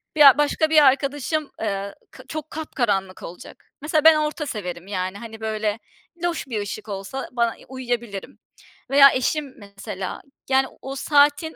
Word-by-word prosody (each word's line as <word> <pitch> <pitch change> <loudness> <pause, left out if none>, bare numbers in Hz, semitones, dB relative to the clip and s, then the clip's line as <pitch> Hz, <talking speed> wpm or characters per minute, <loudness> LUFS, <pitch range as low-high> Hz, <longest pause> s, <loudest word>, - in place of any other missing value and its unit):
Bi - - -4
ya, 280 -2 +9
başka 295 +2 +2
bir 310 -1 +6
arkadaşım, 285 +2 +1
eee, 200 -2 -3 0.2
kı 260 - -13
çok 310 +2 -6
kapkaranlık 210 -12 -2
olacak. 175 - -11
Mesela 305 0 +1
ben 320 0 +8
orta 305 0 -1
severim, 180 -7 -6
yani, 185 0 -3
hani, 225 -1 -10
böyle, 215 0 -2 0.4
loş 340 -4 -2
bir 220 -5 -2
ışık 210 +1 -6
olsa 200 +7 -5
bana 235 -2 0
uyuyabilirim. 240 -5 -5 0.5
Veya 275 0 +8
eşim 275 +2 -1
mesela, 200 -2 -7 0.3
yani, 265 0 +3
o 270 0 -6
saatin 290 +3 +3
255 Hz, 150 wpm, -23 LUFS, 205-295 Hz, 0.5 s, ya